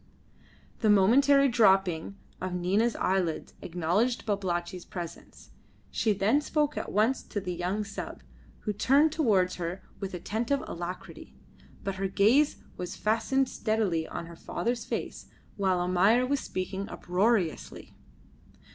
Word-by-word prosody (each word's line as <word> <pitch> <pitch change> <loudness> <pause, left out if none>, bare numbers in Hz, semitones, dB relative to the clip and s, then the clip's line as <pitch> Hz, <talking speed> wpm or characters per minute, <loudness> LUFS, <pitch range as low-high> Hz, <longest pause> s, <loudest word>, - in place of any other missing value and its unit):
The 220 - +2
momentary 275 +8 +5
dropping 195 -6 +3 0.2
of 185 -1 -3
Nina's 200 +6 +1
eyelids 180 -4 -1
acknowledged 180 +9 0
Babalatchi's 180 -3 -2
presence; 175 -2 -9 0.4
she 220 - +1
then 210 +8 +2
spoke 300 -1 0
at - - -4
once 220 +6 +2
to 205 - -4
the 180 -2 -4
young 180 +5 -2
sub, 200 0 -7 0.4
who 210 - -2
turned 275 +9 +4
towards 205 - +2
her 175 +2 -4 0.2
with 195 -2 -4
attentive 230 +9 -1
alacrity, 175 +2 -7 0.5
but 195 -1 -3
her 195 0 -1
gaze 230 +10 +4 0.2
was 180 -1 -5
fastened 255 +5 +1
steadily 215 -10 -1
on - - -6
her 170 0 -11
father's 235 +6 -3
face - - -5 0.3
while 190 -3 +1
Almayer 190 +7 +3
was 280 +2 0
speaking 190 -1 -4
uproariously. 185 -1 -1
200 Hz, 130 wpm, -28 LUFS, 180-235 Hz, 0.5 s, momentary